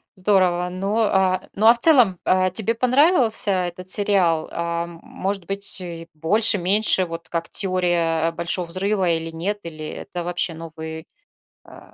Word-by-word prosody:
Здорово. 185 -2 +2
Ну, 195 +4 -2
а, 190 -4 +1
ну, 215 +2 +2
а 230 - +9
в 240 - -9
целом, 235 - +4
а, 185 0 +3
тебе 220 +5 -2
понравился 255 - +2
этот 180 -1 -3
сериал? 185 -6 +1
Ам, 170 0 -4
может 195 -1 -4
быть, 200 0 0
и 170 -2 -7
больше, 205 +8 +2
меньше, 190 +1 +1
вот 165 -1 -8
как 170 -1 -3
"Теория 175 -4 +1
Большого 170 +2 -2
взрыва" 190 +2 0
или 165 0 -1
нет, 190 +6 -3
или 155 -2 -8
это 175 +2 -6
вообще 175 0 -2
новый, 160 0 -8 0.6
э, - - -14
185 Hz, 150 wpm, -22 LUFS, 170-200 Hz, 0.6 s, а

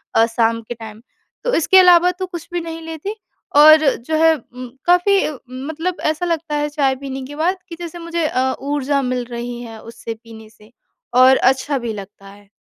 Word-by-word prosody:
अ, 225 - +5
शाम 230 0 0
के 230 +2 -7
टाइम। 220 -2 -11 0.4
तो - - -1
इसके 355 +4 +4
अलावा 360 -1 +6
तो 365 +1 -5
कुछ 345 -3 -8
भी 350 - -1
नहीं 330 0 -7
लेती 325 +6 -6 0.4
और 310 +1 +8
जो 280 +7 -4
है 325 0 +6 0.2
म 250 0 -7 0.2
काफ़ी 355 +3 +4 0.5
मतलब 325 +3 -3
ऐसा 310 +3 0
लगता 330 -3 -2
है 295 0 -1
चाय 280 -3 +1
पीने 270 0 -6
के 290 +2 -9
बाद 345 +5 0
कि 335 - -7
जैसे 345 0 -7
मुझे 335 -1 -2
अ, 260 -2 0
ऊर्जा 285 0 -1
मिल 250 -1 -2
रही 240 0 -5
है 225 -2 -9
उससे 230 0 -8
पीने 220 -1 -13
से 215 0 -21 0.5
और 260 +1 +7
अच्छा 265 +2 +1
भी 235 -3 -4
लगता 200 -1 -11
है। 200 0 -17
285 Hz, 195 wpm, -19 LUFS, 235-330 Hz, 0.5 s, और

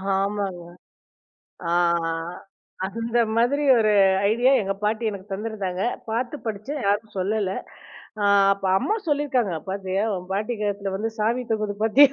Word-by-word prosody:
ஆமாங்க. 195 -2 -2 1.1
ஆ, - - +1 0.4
ஆ. - - -1 0.7
அந்த 230 +4 -2 0.2
மாதிரி 275 +6 +2
ஒரு 215 -1 +3 0.4
ஐடியா 245 +4 +4
எங்க 195 0 -1
பாட்டி 220 +2 0
எனக்கு 200 0 -9
தந்திருந்தாங்க. 195 -3 -3 0.3
பார்த்து 245 +5 -2
படிச்சேன். 220 +8 -4
யாருக்கும் 205 +1 0
சொல்லல. 205 0 0 0.7
அ - - +2 0.3
அப்ப, 195 0 -6
அம்மா 430 - 0
சொல்லியிருக்காங்க, 270 - +1 0.2
"பார்த்தியா! 195 0 -1
உன் 180 0 -6
பாட்டி 210 +5 -1
கழுத்துல 200 -1 -2
வந்து 215 +3 -1
சாவி 230 +4 +1
தொங்குது. 215 -2 0
பார்த்தியா! 270 +5 +6
210 Hz, 135 wpm, -24 LUFS, 195-235 Hz, 1.1 s, பார்த்தியா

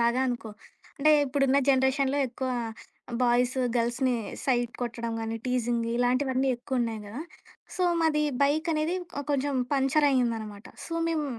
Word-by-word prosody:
లాగా 235 +2 +2
అనుకో. 235 -3 -3 0.5
అంటే 305 +2 +4
ఇప్పుడున్న 275 0 +2
జనరేషన్‌లో 265 +1 +3
ఎక్కువ 260 +2 -4 0.7
బాయ్స్, 245 +1 +2 0.2
గర్ల్స్‌ని 240 +2 +1 0.3
సైట్ 240 -3 +1
కొట్టడం 235 -1 -3
కానీ, 225 0 -3
టీజింగ్ 240 -2 0
ఇలాంటివన్నీ 255 +2 +1
ఎక్కువ 255 +1 -3
ఉన్నాయి 225 -2 -2
కదా! 230 +8 -7 0.5
సో, 365 - -1 0.2
మాది 305 -2 +2 0.2
బైకనేది 310 +3 +1 0.4
కొంచెం 280 0 0 0.2
పంచరయ్యిందనమాట. 255 -7 +1 0.2
సో, 330 - -8 0.2
మేము 315 -2 0
260 Hz, 120 wpm, -27 LUFS, 240-280 Hz, 0.7 s, అంటే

